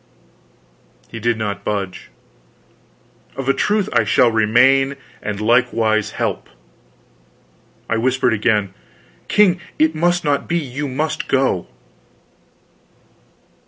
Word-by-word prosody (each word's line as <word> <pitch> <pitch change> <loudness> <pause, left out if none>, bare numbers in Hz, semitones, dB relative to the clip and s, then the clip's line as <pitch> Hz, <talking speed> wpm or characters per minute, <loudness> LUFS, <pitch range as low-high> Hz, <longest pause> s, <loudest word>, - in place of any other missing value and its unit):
He 115 - -6
did 115 +1 0
not 105 -2 -4
budge. 100 -3 -4 1.3
"Of 135 -1 -5
a 135 - +4
truth 210 +4 0
I 115 - +3
shall 115 +3 +3
remain 125 +5 +3 0.3
and 105 -1 -4
likewise 110 -2 +1
help." - - -3 1.4
I 115 - 0
whispered 125 0 +1
again: 105 -2 0 0.5
"King, 190 -4 +3 0.2
it 155 +1 +3
must 175 +2 +1
not 145 -1 0
be. 170 - 0
You 145 -2 -4
must 150 +4 -3
go." 130 -10 0
125 Hz, 105 wpm, -19 LUFS, 110-145 Hz, 1.4 s, a